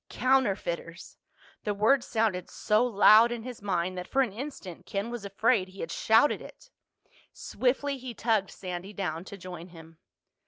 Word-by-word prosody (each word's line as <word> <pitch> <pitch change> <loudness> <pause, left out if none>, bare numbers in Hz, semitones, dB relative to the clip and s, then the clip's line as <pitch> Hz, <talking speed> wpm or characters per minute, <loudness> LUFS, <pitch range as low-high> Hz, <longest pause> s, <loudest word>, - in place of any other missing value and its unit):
Counterfeiters! 195 -10 -1 0.5
The 210 -1 -1
word 240 +6 +3
sounded 215 -6 -1
so 215 +2 +1
loud 225 0 +6
in 235 -2 -4
his 245 -3 -8
mind 185 -2 -1
that 180 - -7
for 270 0 +2
an 225 -7 -4
instant 225 - -8
Ken 200 +4 -3
was 240 -4 -6
afraid 200 0 +1
he 190 +1 -11
had 165 - -5
shouted 225 +10 +3
it. - - -14 0.6
Swiftly 270 +2 -1
he 250 -2 -7
tugged 220 -4 +1
Sandy 185 +2 -7
down 175 -4 -4
to 200 - -9
join 180 -2 -9
him. 165 -2 -15
205 Hz, 160 wpm, -28 LUFS, 180-240 Hz, 0.6 s, loud